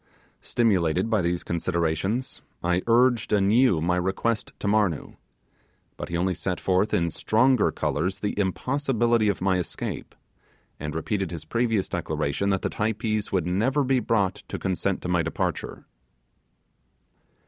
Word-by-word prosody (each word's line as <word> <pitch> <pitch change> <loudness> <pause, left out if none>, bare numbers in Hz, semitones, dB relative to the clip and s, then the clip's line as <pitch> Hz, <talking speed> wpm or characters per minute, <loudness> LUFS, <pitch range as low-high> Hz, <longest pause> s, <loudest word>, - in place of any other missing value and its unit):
Stimulated 95 -3 +1
by 110 -3 +3
these 85 0 -1
considerations, 85 +7 -1 0.2
I 90 +1 +1
urged 120 -1 +3
anew 105 -1 +4
my 90 +2 +1
request 95 +5 -1
to - - -4
Marnoo; 100 -7 +1 0.8
but - - -6
he 85 - -1
only 90 +2 +1
set 90 +2 -3
forth 95 +3 +1
in 85 -5 +1
stronger 125 +5 +3
colours 80 +5 -1
the 105 - -2
impossibility 120 +2 +1
of 100 - -2
my 95 -1 +2
escape, 90 - -5 0.6
and 75 +1 -5
repeated 95 +4 -1
his 80 -3 -6
previous 115 +1 0
declaration 75 +8 -1
that 95 -1 0
the - - 0
Typees 110 0 -1
would 90 -4 +1
never 115 +11 +1
be 130 0 +2
brought 105 -5 +1
to - - -4
consent 95 +1 -1
to - - -3
my 90 -1 +2
departure. 80 0 -3
95 Hz, 140 wpm, -25 LUFS, 90-115 Hz, 0.8 s, anew